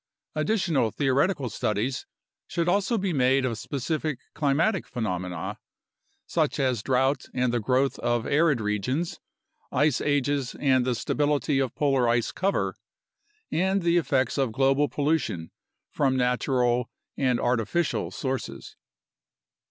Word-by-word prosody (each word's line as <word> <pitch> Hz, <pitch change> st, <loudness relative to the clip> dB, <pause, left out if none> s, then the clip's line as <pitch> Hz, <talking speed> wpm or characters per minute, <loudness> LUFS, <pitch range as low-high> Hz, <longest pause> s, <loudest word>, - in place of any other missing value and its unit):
Additional 155 Hz, -, +1 dB
theoretical 135 Hz, -, +1 dB
studies 115 Hz, +3 st, -2 dB, 0.4 s
should 170 Hz, 0 st, -1 dB
also 200 Hz, +5 st, +2 dB
be 190 Hz, -3 st, -1 dB
made 135 Hz, -1 st, +3 dB
of 115 Hz, -3 st, -2 dB
specific 150 Hz, +1 st, -2 dB, 0.2 s
climatic 165 Hz, +7 st, +1 dB
phenomena, 90 Hz, -8 st, -3 dB, 0.7 s
such -, -, 0 dB
as 130 Hz, -5 st, +1 dB
drought 130 Hz, +2 st, +1 dB
and 125 Hz, -1 st, +1 dB
the 120 Hz, -, +2 dB
growth 130 Hz, +4 st, +1 dB
of 120 Hz, -1 st, 0 dB
arid 150 Hz, -2 st, +3 dB
regions, 110 Hz, -, -1 dB, 0.5 s
ice 145 Hz, -3 st, +2 dB
ages 145 Hz, -2 st, 0 dB
and 130 Hz, -3 st, +3 dB
the 125 Hz, -1 st, +1 dB
stability 145 Hz, +1 st, 0 dB
of 130 Hz, -2 st, -1 dB
polar 135 Hz, -5 st, +2 dB
ice 120 Hz, 0 st, +1 dB
cover, 195 Hz, +2 st, 0 dB, 0.8 s
and 190 Hz, +2 st, +1 dB
the 170 Hz, 0 st, +3 dB
effects 135 Hz, -5 st, +1 dB
of 130 Hz, -4 st, +1 dB
global 135 Hz, +4 st, +2 dB
pollution 145 Hz, -, -1 dB, 0.4 s
from 135 Hz, -2 st, +1 dB
natural 125 Hz, -1 st, +1 dB, 0.3 s
and 130 Hz, -3 st, +1 dB
artificial 125 Hz, +7 st, 0 dB
sources. 130 Hz, -2 st, -5 dB
135 Hz, 120 wpm, -26 LUFS, 125-150 Hz, 0.8 s, made